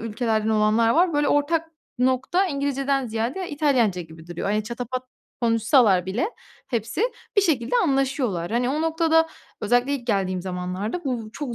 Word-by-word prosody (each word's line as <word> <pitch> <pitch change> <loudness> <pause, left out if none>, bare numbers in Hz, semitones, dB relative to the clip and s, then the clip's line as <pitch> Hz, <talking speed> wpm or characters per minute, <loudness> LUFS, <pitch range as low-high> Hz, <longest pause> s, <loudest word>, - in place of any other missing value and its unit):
ülkelerden 220 -1 -1
olanlar 220 +1 +3
var. 340 +6 +3
Böyle, 290 -1 +2
ortak 320 +3 +1 0.3
nokta 260 +9 +2
İngilizceden 275 -2 -1
ziyade 235 +11 -3
İtalyanca 255 - +1
gibi 160 0 -14
duruyor. 175 +2 -4
Hani, 210 0 0
çatapat 245 +2 -4 0.4
konuşsalar 230 -4 +4
bile 230 - -1 0.4
hepsi, 230 - -2 0.3
bir 405 - +6
şekilde 255 -9 0
anlaşıyorlar. 265 - 0
Hani, 245 +1 +1
o 300 +3 -1
noktada 325 0 +2 0.3
özellikle 245 +5 +2
ilk 245 -4 -6
geldiğim 190 -5 0
zamanlarda, 185 - -4
bu 240 -5 -3
çok 255 -1 -5
245 Hz, 145 wpm, -24 LUFS, 215-285 Hz, 0.4 s, bir